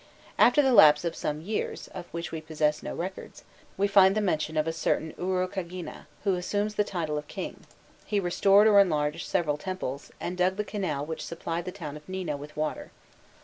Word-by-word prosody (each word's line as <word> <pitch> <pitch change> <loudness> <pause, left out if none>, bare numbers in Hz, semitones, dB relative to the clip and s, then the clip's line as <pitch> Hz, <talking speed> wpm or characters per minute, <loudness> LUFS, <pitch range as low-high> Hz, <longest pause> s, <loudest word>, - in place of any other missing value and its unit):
After 295 - +6
the 265 -2 +3
lapse 150 -6 +7
of 170 - -2
some 150 0 -3
years, 210 +6 -3
of 180 -2 -8
which 170 0 -6
we 160 - -4
possess 155 -1 0
no - - -5
records, 185 +2 -6 0.3
we 200 +1 +2
find 195 -1 +6
the - - +3
mention 155 -6 -1
of 155 - +2
a 165 - -1
certain 160 0 -1
Urukagina, 185 -1 -4 0.2
who 200 -2 +2
assumes 205 +4 -1
the 210 - +2
title 160 -6 -2
of 150 - -11
king: - - -7 0.4
he 205 - 0
restored 195 +3 +4
or 210 -2 +7
enlarged 155 -4 +1
several 150 -3 0
temples, 150 -6 -5
and 180 - -4
dug 185 +1 +3
the 210 - -1
canal 175 -10 -3
which 160 +1 -5
supplied 170 0 -4
the 185 - -4
town 155 -7 -7
of 150 +4 -16
Nina 185 -5 -3
with 145 +2 -10
water. 155 0 -3
175 Hz, 195 wpm, -28 LUFS, 155-195 Hz, 0.4 s, lapse